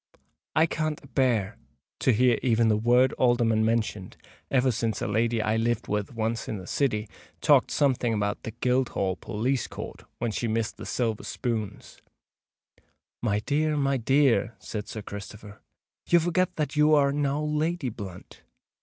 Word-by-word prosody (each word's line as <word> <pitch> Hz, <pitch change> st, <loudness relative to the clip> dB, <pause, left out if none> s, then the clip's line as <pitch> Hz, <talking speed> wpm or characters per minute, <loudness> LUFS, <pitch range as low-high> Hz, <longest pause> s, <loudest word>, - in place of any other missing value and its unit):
"I 160 Hz, -, +5 dB
can't 155 Hz, -2 st, -2 dB
a -, -, -13 dB
bear 115 Hz, -5 st, +1 dB, 0.4 s
to 130 Hz, -, +3 dB
hear 120 Hz, 0 st, +3 dB
even 115 Hz, -3 st, +3 dB
the 105 Hz, -, +4 dB
word 120 Hz, +4 st, +3 dB
Alderman 120 Hz, -3 st, +3 dB
mentioned, 110 Hz, -4 st, -1 dB, 0.3 s
ever 130 Hz, -1 st, +3 dB
since 115 Hz, -1 st, -1 dB
a -, -, -2 dB
lady 110 Hz, +1 st, +1 dB
I 110 Hz, +1 st, +1 dB
lived 115 Hz, 0 st, 0 dB
with 105 Hz, +2 st, -2 dB
once 115 Hz, +1 st, -2 dB
in 110 Hz, -, -3 dB
the 95 Hz, -, -9 dB
City 110 Hz, -3 st, 0 dB, 0.3 s
talked -, -, +4 dB
something 130 Hz, -4 st, +1 dB
about 105 Hz, -2 st, -1 dB
the -, -, -6 dB
Guildhall 120 Hz, -5 st, 0 dB
police 120 Hz, +6 st, -1 dB
court -, -, -8 dB
when 120 Hz, -, -2 dB
she 115 Hz, -, -2 dB
missed 115 Hz, 0 st, -1 dB
the -, -, -8 dB
silver 115 Hz, -4 st, -1 dB
spoons——" 110 Hz, -5 st, -4 dB, 1.2 s
"My 105 Hz, -3 st, 0 dB
dear, 150 Hz, +5 st, 0 dB
my 140 Hz, -1 st, +1 dB
dear," 130 Hz, -2 st, +2 dB
said 105 Hz, +2 st, -6 dB
Sir 110 Hz, -, -6 dB
Christopher; 100 Hz, +1 st, -9 dB, 0.5 s
"you 175 Hz, -, +6 dB
forget 175 Hz, +2 st, 0 dB
that 150 Hz, -1 st, -2 dB
you 150 Hz, +1 st, +5 dB
are 140 Hz, -1 st, +4 dB
now 145 Hz, 0 st, 0 dB
Lady 150 Hz, 0 st, -1 dB
Blunt! 100 Hz, -5 st, -10 dB
120 Hz, 160 wpm, -27 LUFS, 110-140 Hz, 1.2 s, you